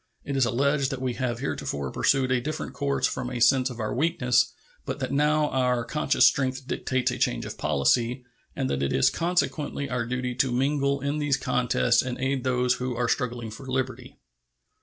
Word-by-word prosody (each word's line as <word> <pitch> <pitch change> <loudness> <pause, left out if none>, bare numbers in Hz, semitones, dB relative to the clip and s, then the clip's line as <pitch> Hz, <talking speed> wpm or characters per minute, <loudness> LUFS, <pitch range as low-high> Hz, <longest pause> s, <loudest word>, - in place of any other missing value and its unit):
It 140 - -4
is 135 -2 +3
alleged 140 +3 +1
that 135 -2 -4
we 130 -1 -1
have 120 -2 -3
heretofore 70 - -3
pursued 130 -2 +2
a 125 -1 +2
different 150 -1 -4
course 140 0 0
from 125 -1 -2
a 125 -1 -4
sense 130 +2 +4
of 120 -2 -9
our 110 -1 -2
weakness, 130 -4 +2 0.3
but - - -4
that - - -3
now 150 +1 +2
our 125 -2 +1
conscious 150 - +2
strength 130 -1 +1
dictates 130 -1 -1
a - - -5
change - - 0
of - - -6
policy, 120 - +1 0.3
and - - -1
that 70 0 -1
it 70 - 0
is 65 - +4
consequently 165 -5 -1
our 120 -2 -1
duty 125 0 -2
to 130 +1 +1
mingle 140 +2 +1
in 140 +2 -1
these 145 -2 +1
contests 125 -2 +2
and 130 -1 -4
aid 135 0 -1
those 125 -1 +2
who 125 -1 -3
are 120 0 0
struggling 120 -3 -2
for 130 +5 -10
liberty. 130 0 -3
130 Hz, 195 wpm, -26 LUFS, 125-140 Hz, 0.3 s, sense